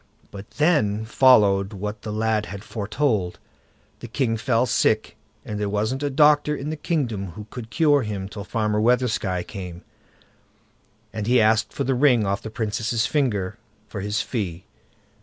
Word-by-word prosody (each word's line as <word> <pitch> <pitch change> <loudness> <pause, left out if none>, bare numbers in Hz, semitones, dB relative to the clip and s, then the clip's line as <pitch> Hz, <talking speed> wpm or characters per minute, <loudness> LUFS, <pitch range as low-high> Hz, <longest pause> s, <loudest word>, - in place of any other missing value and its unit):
But 100 0 -10
then 110 -10 +2
followed 105 -5 +4
what 105 +2 -5
the 110 - -5
lad 110 0 0
had 100 +1 -8
foretold; 105 -3 -1 0.6
the - - -8
king 115 -1 0
fell 115 +2 +1
sick, - - +1 0.3
and 105 -1 -4
there 105 -1 -1
wasn't 110 +6 -1
a 145 - 0
doctor 150 +1 +4
in 145 +2 -4
the - - -2
kingdom 120 - -2
who 105 +3 -9
could 115 -3 -8
cure 145 +4 +3
him 105 -4 -4
till 100 0 -8
Farmer 105 0 -1
Weathersky 110 -6 +1
came, 90 -4 -8 1.3
and 105 -1 -4
he 125 +1 +4
asked 110 +1 +3
for - - -3
the 135 - +1
ring 125 -4 +3
off 100 +1 -1
the - - -7
Princess' 110 +1 -1
finger 115 -7 -1 0.3
for 100 - -6
his 105 +2 -1
fee. 95 -7 -4
110 Hz, 160 wpm, -23 LUFS, 105-125 Hz, 1.3 s, followed